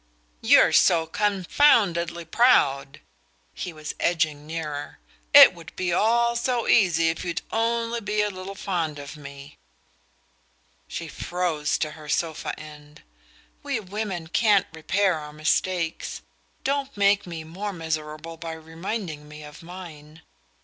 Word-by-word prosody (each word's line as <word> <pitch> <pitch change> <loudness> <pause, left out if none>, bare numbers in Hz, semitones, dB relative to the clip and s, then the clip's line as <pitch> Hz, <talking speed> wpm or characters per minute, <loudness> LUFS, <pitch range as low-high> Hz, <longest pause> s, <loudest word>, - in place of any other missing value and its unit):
"You're - - +6
so 165 -2 +4
confoundedly 185 - +2
proud!" 140 - +2 0.5
He 180 - -5
was 155 -1 -7
edging 155 -4 0
nearer. 150 -3 -5 0.3
"It 285 -7 +10
would 170 -1 -13 0.2
all 235 +5 +3
be 235 - -2
so 245 -2 0
easy 165 -6 +4
if 165 - -3
you'd 175 -2 -3
only 230 +1 0
be 210 0 0
a 210 - -1
little 185 +1 -8
fond 170 -7 -2
of 145 +2 -8
me..." 140 -1 -12 1.3
She - - -6
froze 170 -4 -2
to 155 - -2
her 150 -1 -12
sofa 160 -1 -2
end. 150 -1 -13 0.6
"We - - -2
women 195 -3 -4
can't 205 +3 +3
repair 185 +2 +1
our 150 0 -9
mistakes. 165 +2 -1 0.4
Don't 275 -2 -2
make 200 -1 +3
me 165 -2 -6
more 190 +6 -5
miserable 160 -1 -5
by 165 0 -6
reminding 160 0 -6
me 150 0 -11
of 150 0 -12
mine." 165 -3 -11
170 Hz, 130 wpm, -25 LUFS, 155-200 Hz, 1.3 s, It